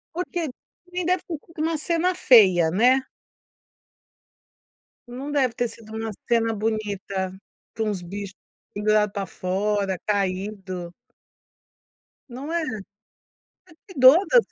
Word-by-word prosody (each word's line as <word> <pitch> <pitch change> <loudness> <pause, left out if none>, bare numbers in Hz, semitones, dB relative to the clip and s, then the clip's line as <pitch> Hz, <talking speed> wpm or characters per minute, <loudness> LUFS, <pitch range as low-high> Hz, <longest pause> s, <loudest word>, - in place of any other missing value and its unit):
Porque 350 -2 -2 0.5
nem 360 0 -1
deve 365 +1 +1
ter 330 - -3
co 335 - -22
uma 320 0 0
cena 340 +4 0
feia, 185 - +6
né. 250 +7 +4 2.0
Não 260 +4 -6
deve 260 -5 +2
ter 245 - -1
sido 220 -1 -11
uma 225 0 -3 0.2
cena 230 -1 +2
bonita, 200 -3 -2 0.5
com 225 - 0
uns 200 -3 -3
bicho 195 +2 -7 0.4
pendurado 210 0 +2
pra 200 -1 -3
fora, 195 +1 -1
caindo. 190 -2 -2 1.4
Não 265 +6 -7
é? 340 0 0
Você 220 -9 -4 1.1
cuido 260 +1 +8
da - - +6
220 Hz, 115 wpm, -24 LUFS, 195-270 Hz, 2.0 s, cuido